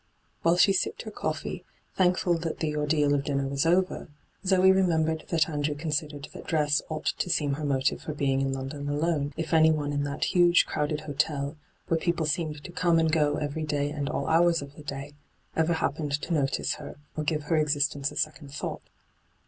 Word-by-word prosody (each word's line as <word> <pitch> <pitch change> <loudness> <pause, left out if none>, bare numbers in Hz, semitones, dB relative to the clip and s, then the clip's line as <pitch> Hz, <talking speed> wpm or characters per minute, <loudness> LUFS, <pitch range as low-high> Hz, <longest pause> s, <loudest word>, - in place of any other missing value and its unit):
* - - -41
While 170 +1 +3
she 195 +2 +5
sipped 190 - -1
her - - -7
coffee, - - -4 0.3
thankful 180 -2 +2
that 165 -1 -3
the 150 -2 -2
ordeal 150 -1 +2
of 140 -1 +1
dinner 140 -1 -1
was 140 +3 0
over, 185 +2 +1 0.4
Zoe 190 0 +5
remembered 160 -4 +2
that 160 -2 +2
Andrew 150 -1 -1
considered 150 -1 -3
that - - -10
dress 150 -2 +2
ought 155 -1 -4
to - - -1
seem 150 -4 +1
her 150 +2 -4
motive 140 -1 +1
for 155 - -5
being 135 -2 +1
in 135 0 0
London 135 +2 -4
alone, 145 -1 0
if 165 0 -3
anyone 155 -2 +4
in 145 0 0
that 145 0 -3
huge 175 -1 +5
crowded 150 0 -2
hotel, 145 0 -1 0.3
where 165 - +1
people 170 -1 0
seemed 150 -1 -2
to 180 - -8
come 175 -1 +2
and 160 -1 +3
go 150 -2 +2
every 150 +1 -3
day 145 -1 -1
and 145 -2 -3
all - - -2
hours 165 -1 +3
of 140 0 -11
the - - -11
day, 140 0 -6 0.4
ever 160 +1 +2
happened 145 -2 -1
to 170 - -3
notice 140 -4 0
her - - -9 0.2
or 155 - -2
give 150 0 -1
her 160 +2 +1
existence 145 -1 +1
a - - -11
second 155 -2 -2
thought. 145 - -4
150 Hz, 200 wpm, -27 LUFS, 145-165 Hz, 0.4 s, she